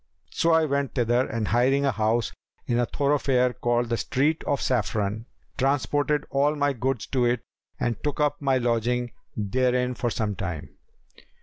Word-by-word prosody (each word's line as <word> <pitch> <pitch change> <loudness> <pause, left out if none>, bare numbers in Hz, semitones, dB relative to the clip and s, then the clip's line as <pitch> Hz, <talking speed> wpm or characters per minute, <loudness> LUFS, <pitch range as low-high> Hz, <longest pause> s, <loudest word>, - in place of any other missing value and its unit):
So 165 - +2
I 160 -1 +4
went 140 -2 -1
thither 120 0 +2
and 110 -2 -2
hiring 130 +4 +3
a 135 - +3
house 110 +1 0 0.3
in 120 0 +1
a 120 - +1
thoroughfare 135 -3 +1
called 120 -1 0
the 115 - 0
Street 145 +7 0
of 140 -2 0
Saffron, 110 -2 -1 0.3
transported 145 +2 +1
all 145 +2 +2
my 145 -1 +1
goods 130 0 -2
to 125 -2 +1
it 120 -1 +1 0.4
and 120 -2 -2
took 145 0 -2
up 145 0 +1
my 135 -2 +2
lodging 120 0 0 0.3
therein 125 +4 +1
for 120 0 -1
some 105 -1 -2
time. 90 -5 -5
125 Hz, 165 wpm, -25 LUFS, 115-140 Hz, 0.4 s, I